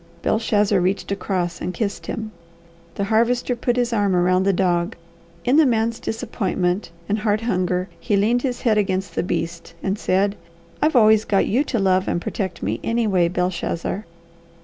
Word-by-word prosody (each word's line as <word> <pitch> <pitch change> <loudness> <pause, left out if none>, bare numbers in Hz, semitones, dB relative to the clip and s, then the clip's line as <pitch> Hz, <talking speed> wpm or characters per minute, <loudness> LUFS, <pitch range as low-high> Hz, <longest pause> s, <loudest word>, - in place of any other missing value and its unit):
Belshazzar 210 -3 +2
reached 190 +2 -1
across 180 -3 -2
and 180 - -3
kissed 205 -3 -3
him. 220 -1 -4 0.6
The 200 - -1
Harvester 235 +4 +1
put 240 +1 0
his 245 -1 0
arm 205 -4 +2
around 185 +1 +3
the - - +5
dog. 180 +1 0 0.5
In 255 +4 +4
the 315 - +6
man's 230 -1 +1
disappointment 200 -5 -2 0.2
and 210 +1 0
heart 210 0 +1
hunger 185 -4 0
he 210 -4 0
leaned 230 +5 +2
his 250 -2 -2
head 220 -4 +3
against 190 -1 -1
the - - 0
beast 170 -1 -4
and 195 +2 -1
said, 195 +2 +1 0.5
"I've 305 -1 +2
always 215 -2 +6
got 200 -3 +2
you 255 +7 +2
to 245 - -1
love 190 -2 +2
and - - 0
protect 190 - -4
me, 105 +5 -1
anyway, 215 -7 +2
Belshazzar. 180 +2 -2
200 Hz, 170 wpm, -22 LUFS, 185-225 Hz, 0.6 s, the